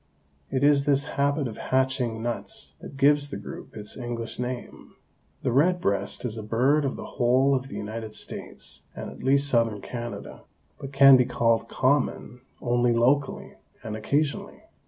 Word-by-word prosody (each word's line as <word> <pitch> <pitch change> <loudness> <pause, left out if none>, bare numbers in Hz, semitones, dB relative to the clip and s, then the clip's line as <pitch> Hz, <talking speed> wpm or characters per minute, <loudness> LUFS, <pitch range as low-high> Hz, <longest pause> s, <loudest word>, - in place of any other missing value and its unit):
It 130 0 -1
is 145 -1 +4
this 140 -1 +3
habit 140 0 0
of 110 - -8
'hatching' 130 -4 0
nuts 120 0 -4
that 140 - -10
gives 145 +1 +4
the 100 - -5
group 100 +2 -9
its 105 -1 -5
English 120 -2 -5
name. 125 0 -6 0.5
The 130 - +1
red 175 +8 +3
breast 100 - -1
is 115 -2 -3
a - - -4
bird 130 +8 +2
of 135 - -1
the - - -7
whole 130 +3 +2
of 135 0 -1
the - - -9
United 110 +1 -6
States - - -6
and - - -6
at - - -12
least 140 +2 +3
southern 115 -5 +2
Canada, 120 +2 -7 0.4
but 135 - -7
can 135 -1 +8
be 125 - +3
called 115 -2 +1
common 130 -3 0 0.2
only 120 0 +2
locally 130 +4 +1 0.3
and 110 - -5
occasionally. 140 +7 -2
125 Hz, 165 wpm, -26 LUFS, 115-140 Hz, 0.5 s, can